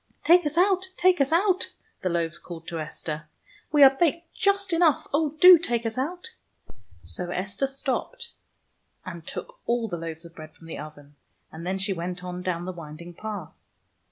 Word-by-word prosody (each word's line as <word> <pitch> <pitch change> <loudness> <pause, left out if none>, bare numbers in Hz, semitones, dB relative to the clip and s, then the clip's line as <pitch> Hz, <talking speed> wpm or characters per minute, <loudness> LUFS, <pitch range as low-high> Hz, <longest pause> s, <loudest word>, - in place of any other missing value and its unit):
" - - -42
Take 345 -1 +6
us 300 +2 -5
out! 375 +1 +3
Take 365 -4 +4
us 275 +2 +2
out! 370 +2 +2
" - - -40
the 185 - 0
loaves 170 -1 -1
called 165 -1 -10
to 165 - -4
Esther. 155 0 -5 0.4
"We 295 -1 +7
are 270 - +10
baked 335 +2 0
just 395 -1 +1
enough. 330 -4 +3
Oh, 300 0 +1
do 360 -2 +10
take 240 -7 -1
us 225 - -1
out! 350 - -4 0.4
" - - -18 0.3
So 90 - -5
Esther 195 +8 -1
stopped 280 - -4 0.7
and 170 -3 -8
took - - -7
all 235 -1 +1
the 175 -5 -4
loaves 165 0 -6
of 165 - -12
bread 155 -1 -11
from 165 - -17
the 165 - -6
oven, 145 -1 -11 0.3
and 165 +2 -8
then 190 +1 0
she 195 +1 0
went 180 +1 -5
on 180 0 -5
down 175 -1 -2
the 185 - -3
winding 170 +1 -9
path. 205 -3 -6
200 Hz, 195 wpm, -26 LUFS, -, 0.7 s, are